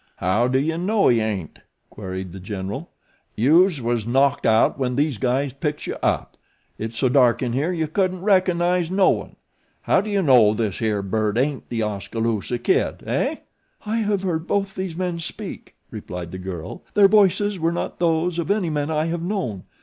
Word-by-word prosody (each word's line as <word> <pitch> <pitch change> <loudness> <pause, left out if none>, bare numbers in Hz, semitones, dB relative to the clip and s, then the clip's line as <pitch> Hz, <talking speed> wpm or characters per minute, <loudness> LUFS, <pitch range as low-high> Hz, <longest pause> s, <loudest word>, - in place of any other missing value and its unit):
"How 105 +7 +1
do 130 +1 +1
you 160 +4 0
know 200 +4 +2
he 120 - +4
ain't?" 100 -7 -4 0.3
queried 95 -2 -6
The 95 - -9
General. 100 - -5 0.5
"Youse 160 - +4
was 120 -1 -1
knocked 135 +3 +2
out 110 +4 +3
when 125 -2 -1
these 145 -4 0
guys 130 +3 0
picks 150 +1 -3
you - - -3
up. - - -1 0.4
It's 110 +1 -5
so 130 - +2
dark 125 -2 +3
in 120 -2 -1
here 145 +7 0
you 160 -3 -1
couldn't 185 +2 -1
reco'nize 180 -3 +2
no 190 +1 +4
one. - - -4 0.5
How - - +3
do 215 - -6
you 200 -2 +1
know 120 -8 +5
this 105 -4 -2
here 105 -3 0
bird 105 +2 -1
ain't 135 +2 -1
The 115 -2 -1
Oskaloosa 110 +2 -2
Kid, 120 - 0
eh?" - - 0 0.5
"I 215 +2 -1
have 205 -3 0
heard 165 -3 -2
both 195 -1 0
these 185 -3 -4
men 180 -1 -2
speak," 165 - -7 0.2
replied 90 -1 -7
the 95 - -6
girl; 90 -3 -6
"their 205 -1 +7
voices 205 -1 +3
were 165 +1 +1
not 170 - -4
those 170 0 +1
of 170 - -3
any 200 -5 +1
men 145 0 -1
I 155 0 0
have 165 0 -2
known. 170 - -3
145 Hz, 190 wpm, -22 LUFS, 110-180 Hz, 0.5 s, their